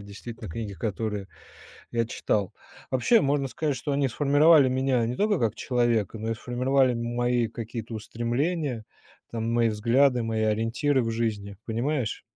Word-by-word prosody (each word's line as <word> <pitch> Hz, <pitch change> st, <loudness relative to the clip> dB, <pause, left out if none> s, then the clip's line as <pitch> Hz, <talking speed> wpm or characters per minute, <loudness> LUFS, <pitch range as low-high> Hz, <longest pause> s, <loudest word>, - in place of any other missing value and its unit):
действительно 110 Hz, +2 st, -9 dB
книги, 105 Hz, +3 st, -5 dB
которые 105 Hz, +1 st, -3 dB, 0.6 s
я 115 Hz, -1 st, +1 dB
читал. 105 Hz, -3 st, -1 dB, 0.4 s
Вообще, 135 Hz, -, +4 dB
можно 140 Hz, 0 st, +1 dB
сказать, 145 Hz, +2 st, -2 dB
что 145 Hz, +4 st, -4 dB
они 140 Hz, 0 st, +2 dB
сформировали 145 Hz, +2 st, +5 dB
меня 130 Hz, -2 st, +1 dB
не 120 Hz, -, -2 dB
только 205 Hz, 0 st, +1 dB
как 115 Hz, -1 st, 0 dB
человека, 120 Hz, -4 st, 0 dB
но 110 Hz, +1 st, -3 dB
и 115 Hz, -, -1 dB
сформировали 125 Hz, +2 st, +1 dB
м 120 Hz, 0 st, -3 dB
мои 120 Hz, -1 st, +1 dB
какие-то 115 Hz, 0 st, -6 dB
устремления, 120 Hz, +3 st, -2 dB, 0.5 s
там, 115 Hz, 0 st, -2 dB
мои 115 Hz, -1 st, +3 dB
взгляды, 120 Hz, +4 st, +3 dB
мои 110 Hz, -1 st, -1 dB
ориентиры 115 Hz, +6 st, +1 dB
в 115 Hz, -, -1 dB
жизни, 105 Hz, -3 st, -3 dB
понимаешь. 120 Hz, +1 st, -1 dB
120 Hz, 150 wpm, -26 LUFS, 110-135 Hz, 0.6 s, сформировали